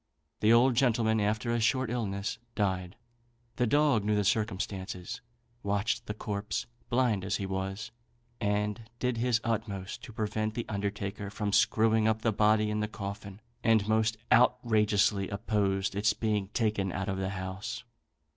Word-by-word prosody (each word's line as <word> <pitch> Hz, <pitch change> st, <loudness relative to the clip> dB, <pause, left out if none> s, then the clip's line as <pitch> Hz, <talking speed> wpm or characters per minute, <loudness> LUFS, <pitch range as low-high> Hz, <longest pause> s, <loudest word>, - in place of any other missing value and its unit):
The 110 Hz, -, +4 dB
old 120 Hz, +3 st, +6 dB
gentleman, 115 Hz, -3 st, +2 dB
after 110 Hz, +3 st, 0 dB
a 120 Hz, -, +1 dB
short 130 Hz, +1 st, +1 dB
illness, 105 Hz, -3 st, -2 dB, 0.2 s
died. 95 Hz, -2 st, -1 dB, 0.6 s
The 125 Hz, -, +2 dB
dog 145 Hz, -3 st, +3 dB
knew 105 Hz, +1 st, +1 dB
the 105 Hz, -, +2 dB
circumstance, 100 Hz, +1 st, -2 dB, 0.4 s
watched 110 Hz, +4 st, -1 dB
the 105 Hz, -, -3 dB
corpse, 100 Hz, -3 st, -3 dB, 0.2 s
blind 120 Hz, -6 st, +2 dB
as 100 Hz, +2 st, -1 dB
he 100 Hz, -, -2 dB
was, 95 Hz, +4 st, -4 dB, 0.5 s
and 105 Hz, +1 st, -1 dB
did 125 Hz, -1 st, -1 dB
his 120 Hz, 0 st, +2 dB
utmost 105 Hz, -4 st, -3 dB
to 125 Hz, -, -10 dB
prevent 110 Hz, 0 st, -2 dB
the 120 Hz, -, -2 dB
undertaker 100 Hz, -1 st, -3 dB
from 100 Hz, 0 st, -3 dB
screwing 110 Hz, 0 st, +4 dB
up 110 Hz, 0 st, +1 dB
the 115 Hz, -, +2 dB
body 105 Hz, +1 st, +3 dB
in 105 Hz, -, -1 dB
the 105 Hz, -, 0 dB
coffin, 100 Hz, -1 st, -7 dB, 0.2 s
and 110 Hz, -3 st, +3 dB
most 110 Hz, 0 st, +2 dB, 0.2 s
outrageously 110 Hz, -5 st, +3 dB
opposed 100 Hz, -1 st, 0 dB
its 100 Hz, +1 st, +2 dB
being 105 Hz, -3 st, -1 dB
taken 105 Hz, -3 st, 0 dB
out 95 Hz, +2 st, -3 dB
of 95 Hz, -2 st, -1 dB
the 95 Hz, 0 st, -1 dB
house. 95 Hz, +1 st, -5 dB
105 Hz, 155 wpm, -30 LUFS, 100-115 Hz, 0.6 s, old